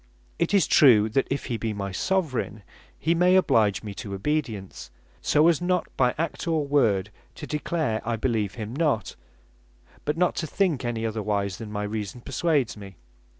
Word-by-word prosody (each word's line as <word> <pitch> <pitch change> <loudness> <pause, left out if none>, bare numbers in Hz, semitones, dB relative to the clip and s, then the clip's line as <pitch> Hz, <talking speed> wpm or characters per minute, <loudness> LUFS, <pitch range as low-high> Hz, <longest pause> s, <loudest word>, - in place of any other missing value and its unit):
It - - +1
is 200 -2 +4
true, 110 -7 +6
that 135 +5 +1
if 140 - -2
he 120 - -2
be 110 -1 -2
my 100 -1 -4
Soveraign, 130 - -1 0.3
he 165 - +1
may 180 +2 +4
oblige 110 - +3
me 105 -2 -6
to 100 -5 -5
obedience, 110 -4 -3 0.3
so, 150 +2 +4
as 170 -2 +3
not 180 0 -1
by 125 -1 +2
act 165 +2 -3
or 160 -3 +1
word 105 -9 +2 0.2
to - - -7
declare 150 -6 -1
I 115 +1 -1
beleeve 110 -4 -1
him 110 0 -6
not; 145 -8 0 0.9
but 150 +2 -1
not 180 +1 +2
to 160 - -2
think 165 -5 0
any 115 -2 -2
otherwise 105 -3 -2
then 110 -2 -7
my 105 0 -3
reason 105 +2 -4
perswades 140 -1 0
me. 100 -2 -11
120 Hz, 175 wpm, -25 LUFS, 105-155 Hz, 0.9 s, true